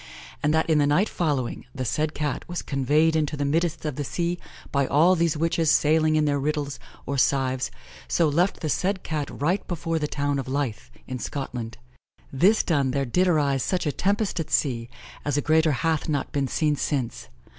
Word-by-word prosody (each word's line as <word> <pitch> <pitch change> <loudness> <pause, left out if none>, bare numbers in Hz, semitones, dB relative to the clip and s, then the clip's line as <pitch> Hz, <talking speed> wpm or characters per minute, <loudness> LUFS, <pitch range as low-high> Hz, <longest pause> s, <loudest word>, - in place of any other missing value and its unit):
and 150 - +2
that 160 +1 +2
in 160 -2 +3
the 145 - +3
night 175 +9 +3
following, 145 -8 -1
the 130 -2 -3
said 155 +6 -1
Cat 150 -1 -2
was 175 - -3
conveyed 150 +4 +2
into 150 -1 0
the 145 - -1
middest 165 +2 0
of 150 -4 -3
the 145 - -1
sea 175 +5 -2 0.3
by 140 -1 +1
all 165 +6 +5
these 165 -2 +1
witches 165 0 +1
sayling 155 0 +3
in 155 -1 +3
their 145 -1 +1
riddles, 145 0 -2 0.3
or 140 - -2
cives, 130 -1 +1 0.4
so 165 - +2
left 170 +6 +1
the 160 - -1
said 190 +6 0
Cat 150 -3 -3
right 175 +8 -1
before 165 -1 -2
the 150 - -1
towne 145 -1 -1
of 135 - -5
Leith, 130 - -2 0.2
in 130 -1 -5
Scotland. 120 -4 -5 0.6
This 190 +11 +4
done, 140 -6 +1
there 135 +1 0
did 180 +10 +2
arise 145 -6 +2
such 180 +5 -1
a 150 - +1
tempest 200 +3 0
at 165 - -3
sea, 120 -5 0 0.3
as 145 0 0
a - - +4
greater 160 +1 +3
hath 160 +4 0
not 145 -3 -1
been 140 -2 0
seen 150 +1 +1
since. 135 -4 -2
150 Hz, 200 wpm, -25 LUFS, 140-165 Hz, 0.6 s, all